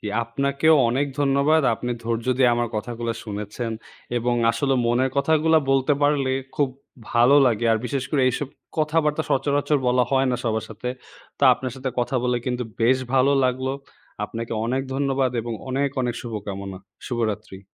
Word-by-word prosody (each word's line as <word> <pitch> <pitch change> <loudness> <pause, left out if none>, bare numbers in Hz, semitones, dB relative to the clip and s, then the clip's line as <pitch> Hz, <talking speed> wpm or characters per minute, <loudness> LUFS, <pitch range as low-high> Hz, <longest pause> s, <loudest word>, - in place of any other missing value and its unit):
জি, - - -7 0.2
আপনাকেও 140 +6 +2
অনেক 135 +4 +1
ধন্যবাদ। 140 +3 +3
আপনি 125 +2 -5
ধৈর্য 115 +1 -2
দিয়ে 130 -2 +5
আমার 120 -1 -1
কথাগুলা 115 +1 -3
শুনেছেন 105 +2 -5 0.5
এবং 120 +1 0 0.2
আসলেও 135 +3 0
মনের 125 +2 +2
কথাগুলা 160 +3 +3
বলতে 135 +1 +3
পারলে, 145 -2 +2 0.3
খুব 145 -2 +2 0.4
ভালো 120 +4 +5
লাগে। 115 -1 +1
আর 110 - +2
বিশেষ 135 -1 -2
করে, 145 - +2
এইসব 130 +2 -2 0.3
কথাবার্তা 155 0 +1
সচরাচর 145 +2 +1
বলা 125 0 +3
হয় 135 0 +3
না 125 - 0
সবার 110 -1 -1
সাথে। 110 +3 -6 0.5
তা 140 - +2
আপনার 130 -1 -5
সাথে 130 0 -3
কথা 125 +2 0
বলে 125 0 +1
কিন্তু 125 0 -1 0.2
বেশ 130 +3 +4 0.2
ভালো 135 +2 +4
লাগলো। 130 +1 0 0.5
আপনাকে 115 +2 -6
অনেক 130 +3 0
ধন্যবাদ 135 -2 +1
এবং 115 +1 -5 0.2
অনেক, 140 +2 0
অনেক 125 -2 -1
শুভকামনা। 100 -4 -6 0.3
শুভরাত্রি। 110 -5 -3
130 Hz, 160 wpm, -23 LUFS, 115-140 Hz, 0.5 s, দিয়ে